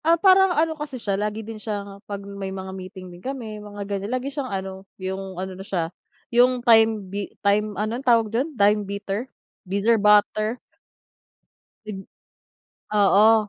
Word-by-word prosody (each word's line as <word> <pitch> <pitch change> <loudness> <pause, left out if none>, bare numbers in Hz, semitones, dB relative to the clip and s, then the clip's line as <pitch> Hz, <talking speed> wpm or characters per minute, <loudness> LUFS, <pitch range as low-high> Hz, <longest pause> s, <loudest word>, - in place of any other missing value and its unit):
Ah, 335 +1 +5
parang 385 +1 +6
ano, 320 +1 +3
kasi 295 -4 -6
siya 205 -4 -2
lagi 210 +2 -2
din 220 -1 -8
siyang, 200 -2 -5
pag 200 -1 -5
may 200 -1 -5
mga 190 0 -6
meeting 185 -1 -9
din 175 - -13
kami 230 -5 -5
mga 205 -1 -7
ganyan 200 0 -3
lagi 270 +2 -5
siyang 280 -2 -3
ano, 190 -1 -4 0.2
yung 190 0 -5
ano 190 +1 -4
na 185 - -9
siya, 175 -3 -2 0.4
yung 245 +1 +4
time 225 -3 +5
bi 200 +2 -4 0.2
time 205 0 +2
anun, 215 +4 -2
tawag 230 -4 +3
dun 260 +7 +1
time 210 0 +4
beater, 200 +4 -4 0.3
bizzer 205 +3 +1
butter? 210 +2 +4 1.3
Id 195 -2 -6 0.9
Oo. 210 +1 +5
210 Hz, 160 wpm, -24 LUFS, 195-230 Hz, 1.3 s, parang